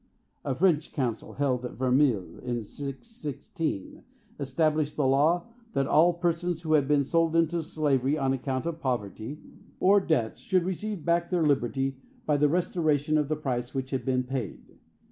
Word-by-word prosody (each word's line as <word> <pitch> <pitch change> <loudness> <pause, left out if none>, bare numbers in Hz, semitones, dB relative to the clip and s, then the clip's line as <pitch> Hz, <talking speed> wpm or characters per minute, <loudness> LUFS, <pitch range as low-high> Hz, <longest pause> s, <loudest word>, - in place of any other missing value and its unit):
A 135 - -1
French 165 -2 +2
council, 120 -5 -2
held 130 -3 0
in 125 - -6
Verneuil 125 - +1
in 120 -2 -3
616, 145 - -5 0.4
established 150 +2 0
the 145 - +1
law 150 +6 +3 0.3
that 135 - +1
all 165 +5 +5
persons 170 0 -1
who 155 -1 +1
had 145 -3 +4
been 145 -1 +3
sold 165 +3 +1
into 165 0 +2
slavery 150 -4 +1
on 135 -2 +1
account 130 +1 -2
of 165 -1 -3
poverty 120 0 -3 0.4
or 200 +2 +5
debt 145 -11 0
should 185 -3 +1
receive 190 0 -4
back 170 0 +2
their 175 -3 +1
liberty 135 -1 +1 0.3
by 150 - +2
the 145 0 +3
restoration 155 -3 +1
of 150 -2 +2
the 155 - 0
price 125 -4 -3
which 130 0 -3
had 130 - -1
been 130 -1 +1
paid. 125 -4 -6
145 Hz, 165 wpm, -28 LUFS, 130-165 Hz, 0.4 s, all